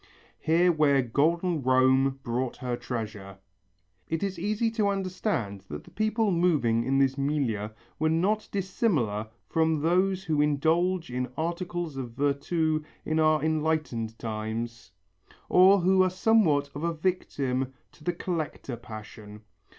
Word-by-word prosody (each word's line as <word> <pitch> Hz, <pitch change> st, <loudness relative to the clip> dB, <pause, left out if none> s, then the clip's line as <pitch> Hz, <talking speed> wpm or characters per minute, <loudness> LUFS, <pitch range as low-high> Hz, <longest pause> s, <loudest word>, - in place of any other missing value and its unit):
(Here 175 Hz, +3 st, +3 dB
where 145 Hz, -4 st, +3 dB
golden 165 Hz, +7 st, +1 dB
Rome 130 Hz, +1 st, +3 dB
brought 120 Hz, +1 st, -2 dB
her 125 Hz, -1 st, -3 dB
treasure.) 110 Hz, -5 st, -6 dB, 0.7 s
It 165 Hz, +2 st, -1 dB
is 190 Hz, -3 st, -3 dB
easy 215 Hz, +4 st, 0 dB
to 220 Hz, -2 st, +1 dB
understand 185 Hz, -, -2 dB
that 75 Hz, -3 st, -7 dB
the -, -, -17 dB
people 215 Hz, 0 st, +1 dB
moving 150 Hz, -10 st, +2 dB
in 135 Hz, +3 st, +1 dB
this 135 Hz, 0 st, +2 dB
milieu 135 Hz, -8 st, -1 dB, 0.3 s
were 155 Hz, +1 st, +2 dB
not 195 Hz, +7 st, +1 dB
dissimilar 165 Hz, -, 0 dB, 0.2 s
from 160 Hz, -1 st, +1 dB
those 185 Hz, +3 st, +2 dB
who 155 Hz, -2 st, +1 dB
indulge 160 Hz, +3 st, +1 dB
in 125 Hz, 0 st, -2 dB
articles 170 Hz, -2 st, -3 dB
of 125 Hz, -3 st, -5 dB
virtu 155 Hz, +4 st, 0 dB, 0.2 s
in 155 Hz, 0 st, 0 dB
our 155 Hz, -1 st, +3 dB
enlightened 155 Hz, -8 st, -1 dB
times, 115 Hz, 0 st, -5 dB, 0.6 s
or 190 Hz, +2 st, +6 dB
who 190 Hz, +2 st, +4 dB
are 185 Hz, -, +4 dB
somewhat 180 Hz, -8 st, +2 dB
of 145 Hz, -, -6 dB
a 170 Hz, -1 st, 0 dB
victim 135 Hz, -7 st, -1 dB, 0.2 s
to 150 Hz, -, -19 dB
the 175 Hz, -, 0 dB
collector 160 Hz, -7 st, -4 dB
passion. 105 Hz, -2 st, -10 dB
155 Hz, 135 wpm, -27 LUFS, 125-175 Hz, 0.7 s, or